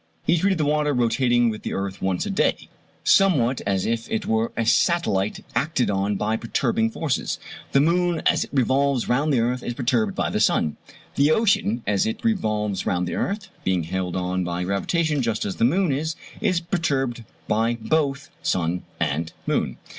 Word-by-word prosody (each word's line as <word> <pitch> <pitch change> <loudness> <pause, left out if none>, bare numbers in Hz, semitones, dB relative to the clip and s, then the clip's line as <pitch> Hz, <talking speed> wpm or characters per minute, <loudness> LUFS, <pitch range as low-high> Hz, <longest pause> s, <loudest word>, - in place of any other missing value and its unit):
He 170 - +3
treated 190 +1 +2
the 155 - +1
water, 150 0 +1
rotating 120 0 +2
with 110 - -7
the - - -4
earth 95 0 -4
once 95 -2 0
a - - -2
day, - - 0 0.3
somewhat 135 -11 +3
as 95 -2 +1
if 115 0 -2
it 220 -3 -2
were 110 +1 0
a 115 - +1
satellite 110 - +1
acted 125 -1 +1
on 100 +1 0
by 110 +3 0
perturbing 225 - 0
forces. 160 - -2 0.3
The 140 - +4
moon 175 +2 +1
as - - +3
it - - -19
revolves 135 -1 +1
round 145 +5 +1
the 125 -4 +3
earth 125 +2 0
is 120 - -4
perturbed 120 -6 0
by - - -1
the - - 0
sun. 75 - +2 0.4
The 140 +2 +4
ocean 155 - +2
as 100 0 +1
it 110 - -4
revolves 105 - 0
round 90 0 0
the - - -3
earth 195 0 -2
(being 95 -2 +1
held 90 +1 -3
on 90 0 -1
by 90 0 -2
gravitation 150 - 0
just 115 -3 -1
as 100 - -4
the 115 - +3
moon 175 +5 +2
is) 155 +4 -1 0.3
is 185 -5 +2
perturbed 140 -9 -1 0.2
by 115 +2 +1
both 140 +3 -1
sun 90 0 0 0.2
and 80 +3 -1
moon. - - -1
120 Hz, 185 wpm, -23 LUFS, 100-155 Hz, 0.4 s, The